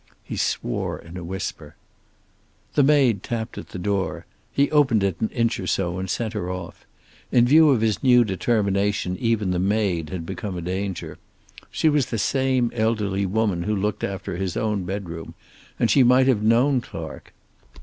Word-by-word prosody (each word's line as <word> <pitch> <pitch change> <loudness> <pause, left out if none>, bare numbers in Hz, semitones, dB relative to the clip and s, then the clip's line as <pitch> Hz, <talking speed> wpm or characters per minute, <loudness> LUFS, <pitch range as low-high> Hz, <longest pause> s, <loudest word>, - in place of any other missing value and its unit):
He - - -6
swore - - -2
in 85 +1 -12
a 90 - -6
whisper. 95 +3 -6 1.0
The - - +4
maid 135 -8 +4
tapped 110 0 -4
at - - -10
the - - -7
door. 95 -3 -2 0.3
He 140 +1 +1
opened 135 -9 +3
it 95 -4 -1
an 110 - +1
inch 115 -3 0
or 95 - -4
so 90 -1 -1
and 95 0 -4
sent 115 +2 -2
her 100 -4 -3
off. 90 -1 -7 0.4
In 120 -1 +5
view 155 +4 +6
of 130 -6 +3
his 110 -2 +1
new 125 -2 +6
determination 100 -2 0
even 115 -5 +1
the 90 - 0
maid 95 -5 0
had 85 0 -5
become 95 +1 -5
a - - -4
danger. 90 -3 -4 0.5
She - - 0
was 150 -4 +3
the 115 - -3
same 130 +1 +1
elderly 105 -4 0
woman 100 -3 0
who 105 +5 -1
looked 105 +1 -2
after 95 -3 -4
his 95 -2 -3
own 105 -4 -1
bedroom, 90 -4 -6 0.4
and 115 - +2
she 135 - +5
might 125 +1 +5
have 130 -6 +2
known 120 +5 +3
Clark. - - -9
105 Hz, 180 wpm, -23 LUFS, 95-120 Hz, 1.0 s, view